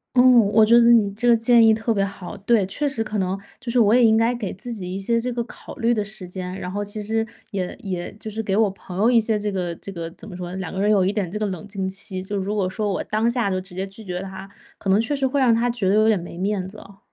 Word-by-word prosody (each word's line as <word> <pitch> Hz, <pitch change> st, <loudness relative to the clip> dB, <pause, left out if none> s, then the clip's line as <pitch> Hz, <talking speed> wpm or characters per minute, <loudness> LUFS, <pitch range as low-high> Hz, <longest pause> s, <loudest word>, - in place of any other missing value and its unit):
哦， 245 Hz, -, +7 dB, 0.3 s
我 220 Hz, +1 st, +6 dB
觉 225 Hz, +2 st, +6 dB
得 235 Hz, 0 st, +6 dB
你 215 Hz, -4 st, +5 dB
这 240 Hz, +3 st, -1 dB
个 240 Hz, -, +7 dB
建 230 Hz, 0 st, +5 dB
议 220 Hz, -, +6 dB
特 220 Hz, +1 st, -1 dB
别 200 Hz, -3 st, +2 dB
好。 195 Hz, 0 st, -8 dB
对， 205 Hz, +2 st, +2 dB
确 290 Hz, +9 st, -1 dB
实 270 Hz, -5 st, -1 dB
可 215 Hz, -1 st, -4 dB
能 190 Hz, -1 st, 0 dB, 0.2 s
就 235 Hz, -, -5 dB
是 245 Hz, -, +2 dB
我 220 Hz, 0 st, +5 dB
也 245 Hz, -1 st, +6 dB
应 220 Hz, -1 st, +5 dB
该 230 Hz, +2 st, +3 dB
给 215 Hz, -5 st, -4 dB
自 240 Hz, +6 st, -7 dB
己 185 Hz, -5 st, -5 dB
一 -, -, -4 dB
些 230 Hz, +4 st, +1 dB
这 245 Hz, +1 st, -3 dB
个 235 Hz, 0 st, -1 dB
考 -, -, -10 dB
虑 235 Hz, -2 st, +1 dB
的 215 Hz, -3 st, 0 dB
时 200 Hz, -3 st, -8 dB
间， 180 Hz, 0 st, -5 dB
然 180 Hz, -1 st, -5 dB
后 205 Hz, +1 st, -3 dB
其 205 Hz, +1 st, -6 dB
实 225 Hz, +2 st, -1 dB, 0.2 s
也 190 Hz, -4 st, -3 dB
也 185 Hz, -5 st, -4 dB
就 220 Hz, -, -6 dB
是 220 Hz, +1 st, -4 dB
给 195 Hz, -2 st, -1 dB
我 215 Hz, -1 st, +3 dB
朋 190 Hz, -1 st, -10 dB
友 220 Hz, +4 st, +4 dB
一 240 Hz, -2 st, +5 dB
些 220 Hz, -1 st, 0 dB
这 210 Hz, 0 st, -2 dB
个 180 Hz, -3 st, -2 dB
这 195 Hz, -, -8 dB
个 170 Hz, -3 st, -5 dB
怎 -, -, -12 dB
么 180 Hz, -, -8 dB
说， 180 Hz, -1 st, -6 dB
两 190 Hz, -3 st, -5 dB
个 190 Hz, -, -4 dB
人 205 Hz, +2 st, +3 dB
有 200 Hz, -3 st, +4 dB
一 190 Hz, -, +2 dB
点 200 Hz, -5 st, -2 dB
这 210 Hz, -, -4 dB
个 215 Hz, -, 0 dB
冷 190 Hz, +1 st, -5 dB
静 195 Hz, -2 st, -3 dB
期， 190 Hz, 0 st, -5 dB
就 200 Hz, +2 st, -4 dB
如 195 Hz, +2 st, -2 dB
果 195 Hz, -3 st, 0 dB
说 210 Hz, +3 st, -2 dB
我 -, -, -2 dB
当 215 Hz, +2 st, 0 dB
下 235 Hz, -3 st, +1 dB
就 185 Hz, -1 st, -1 dB
直 185 Hz, 0 st, -11 dB
接 190 Hz, +2 st, -3 dB
拒 205 Hz, +3 st, -10 dB
绝 180 Hz, -1 st, -4 dB
他， 195 Hz, 0 st, -8 dB, 0.3 s
可 -, -, -8 dB
能 195 Hz, +3 st, +4 dB
确 245 Hz, +6 st, -1 dB
实 275 Hz, -1 st, 0 dB
会 270 Hz, +2 st, +1 dB
让 255 Hz, -3 st, +4 dB
他 230 Hz, +2 st, +2 dB
觉 215 Hz, -6 st, -1 dB
得 200 Hz, -, +3 dB
有 215 Hz, +1 st, +4 dB
点 215 Hz, -4 st, +3 dB
没 170 Hz, 0 st, -9 dB
面 190 Hz, 0 st, -1 dB
子 210 Hz, -, -11 dB
哦。 195 Hz, -1 st, -14 dB
205 Hz, 335 characters per minute, -22 LUFS, 190-225 Hz, 0.3 s, 哦